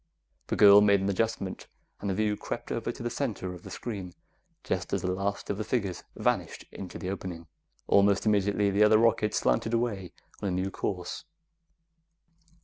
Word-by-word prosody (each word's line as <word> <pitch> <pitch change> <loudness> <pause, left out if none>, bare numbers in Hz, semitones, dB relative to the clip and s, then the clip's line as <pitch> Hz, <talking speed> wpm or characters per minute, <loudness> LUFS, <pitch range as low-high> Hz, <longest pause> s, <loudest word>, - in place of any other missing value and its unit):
The - - -1
girl 100 -1 +8
made 100 -1 +5
an 95 - 0
adjustment, 100 -1 -2 0.3
and 100 - -3
the 95 - 0
view 105 0 +1
crept - - -6
over - - -2
to - - -9
the 120 - -2
center 115 -8 -3
of 90 - -10
the 95 - -10
screen 95 -2 -6 0.5
just - - -2
as - - 0
the 90 - 0
last 100 +2 -2
of 100 - -4
the - - -1
figures 100 -6 -2
vanished - - -1
into 95 -2 -8
the 90 - -4
opening. 90 -4 -6 0.4
Almost 100 0 +4
immediately, 100 -1 +2
the 100 +2 +4
other 105 0 +6
rocket 115 -1 +2
slanted 110 - +1
away 105 -7 -2 0.3
on 100 - -1
a - - 0
new 95 +2 -1
course. 90 - -4
100 Hz, 180 wpm, -28 LUFS, 95-110 Hz, 0.5 s, girl